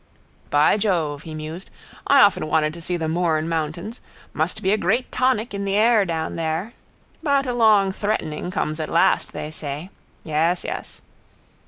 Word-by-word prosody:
—By 145 +7 +4
Jove, 165 -9 0
he 160 -1 -8
mused, 155 +4 -7 0.4
I 280 -1 +6
often 200 -7 +4
wanted 155 -1 +1
to 170 - -10
see 175 +1 -2
the 160 -1 -2
Mourne 160 -1 0
mountains. 165 +7 -3 0.3
Must 160 +4 -2
be 190 - +2
a - - +5
great 215 +6 0
tonic 250 -4 +1
in 200 0 -3
the 195 0 -1
air 220 -1 +4
down 160 -2 -3
there. 165 +7 -2 0.5
But 280 -3 +2
a 250 - -1
long 215 -5 +4
threatening 190 -6 -2
comes 155 -3 -2
at 155 - -3
last, 165 - +2
they 150 - -6
say. 155 +4 -6 0.3
Yes. 165 +3 0
Yes. - - -6
175 Hz, 170 wpm, -22 LUFS, 155-210 Hz, 0.5 s, I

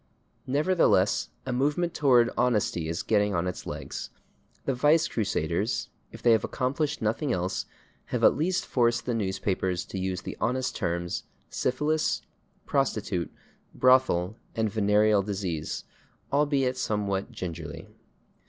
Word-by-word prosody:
Nevertheless, 155 +7 +3 0.2
a 130 - -2
movement 150 +7 +1
toward 125 -7 +4
honesty 105 -9 +1
is 85 - -2
getting 105 -2 +2
on 85 +1 0
its 90 - -4
legs. - - -5 0.6
The 135 - +1
vice 150 +6 +4
crusaders, 100 -1 -1 0.2
if - - -12
they 120 - +6
have 110 -3 +4
accomplished 140 +1 -1
nothing 115 +6 0
else, 90 -3 -1 0.4
have - - -3
at - - +6
least 175 +4 0
forced 120 -2 +1
the 125 - 0
newspapers 95 -3 -1
to 95 - -5
use 95 -1 -2
the - - -6
honest 125 +2 0
terms, 85 -2 -2 0.3
/syphilis/, 150 +5 0 0.4
/prostitute/, 110 - 0 0.5
/brothel/ 125 -8 +4 0.2
and 110 -2 0
/venereal 105 0 +3
disease/, 95 -6 -3 0.5
albeit 140 -3 +2
somewhat 100 -4 -1
gingerly. 85 -4 -6
110 Hz, 125 wpm, -27 LUFS, 95-130 Hz, 0.6 s, they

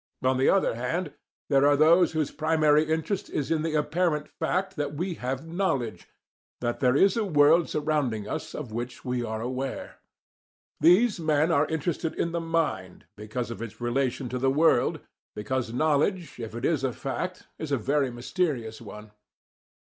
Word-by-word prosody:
On 130 0 +2
the 130 - +3
other 195 - +3
hand, 125 +10 -3 0.3
there 140 +1 +4
are 145 0 +4
those 165 +3 +5
whose 155 -2 -1
primary 155 -1 +3
interest 160 +5 -2
is 145 0 -3
in 160 -1 +2
the 160 0 -2
apparent 150 0 0
fact 185 +4 -2
that 145 -1 -3
we 175 +4 -2
have 130 0 -4
KNOWLEDGE, 165 - -2 0.5
that 120 -1 -2
there 125 -1 +3
is 195 +6 +4
a 230 - +1
world 160 -2 +4
surrounding 145 -9 -1
us - - -5
of 130 -7 -6
which 120 +2 -6
we 125 -1 -1
are 110 -1 -4
aware. 130 +2 -4 0.8
These 190 +6 +5
men 155 0 +2
are 150 -1 +3
interested 160 +1 -2
in 170 - -1
the 170 0 -2
mind 160 - -2
because 110 +3 -5
of 115 - -7
its 115 -2 -7
relation 125 +2 -1
to 125 - -3
the 135 +1 +2
world, 155 +5 +3 0.3
because 115 +3 -2
knowledge, 155 - 0
if 115 -1 -6
it 120 - -3
is 155 -5 +1
a 130 -2 0
fact, 180 +9 -4
is 155 -2 -5
a 140 - +2
very 135 +3 +1
mysterious 120 - -2
one. 105 -1 -10
145 Hz, 170 wpm, -27 LUFS, 125-165 Hz, 0.8 s, those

